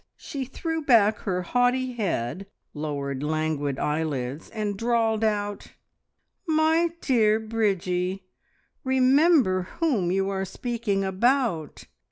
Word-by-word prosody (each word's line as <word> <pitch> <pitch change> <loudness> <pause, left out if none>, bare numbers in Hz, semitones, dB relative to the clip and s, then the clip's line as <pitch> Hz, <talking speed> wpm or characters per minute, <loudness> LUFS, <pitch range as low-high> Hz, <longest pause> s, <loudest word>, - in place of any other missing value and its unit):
She 275 -2 -5
threw 325 +5 -4
back 220 -7 +4
her 180 -2 -2
haughty 250 +5 +1
head, 185 - -2 0.3
lowered 140 -3 -4
languid 150 -2 -1
eyelids, 150 -2 -2
and 210 -2 -3
drawled 225 0 +1
out 205 -1 -2 0.7
"My 320 +2 +3
dear 220 -5 +3
Bridgie, 190 -4 -1 0.6
remember 260 - +3
whom 240 - +1
you 195 +1 +1
are 190 -1 -2
speaking 210 0 -2
about! 195 - 0
205 Hz, 105 wpm, -25 LUFS, 180-245 Hz, 0.7 s, back